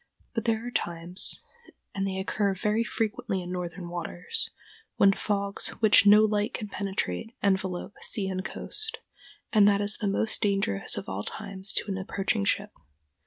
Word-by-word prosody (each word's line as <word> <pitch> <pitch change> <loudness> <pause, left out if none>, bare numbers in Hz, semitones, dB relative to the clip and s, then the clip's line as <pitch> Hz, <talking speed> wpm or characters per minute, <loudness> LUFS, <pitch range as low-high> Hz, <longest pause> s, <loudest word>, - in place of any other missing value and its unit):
] - - -36
But 230 -1 -2
there 225 0 +1
are 245 - -4
times—and 185 - -3
they 190 -1 -3
occur 195 +1 0
very 210 +4 +1
frequently 220 -2 -2
in 175 - -6
northern 180 0 -4
waters—when 195 - 0
fogs 200 0 0
which 215 -2 +6
no 210 +1 +9
light 210 +1 +1
can 210 -3 -4
penetrate 195 - -3
envelop 190 -1 0
sea 200 -3 0
and 185 0 -2
coast, 440 - -3 0.6
and 210 -2 +7
that 200 -1 +4
is 205 +1 +2
the 210 - -1
most 205 +2 +1
dangerous 195 - +1
of - - -5
all 95 +1 -3
times 190 - -3
to - - -1
an 190 - -2
approaching 190 - -1
ship. - - 0
200 Hz, 160 wpm, -28 LUFS, 190-215 Hz, 0.6 s, no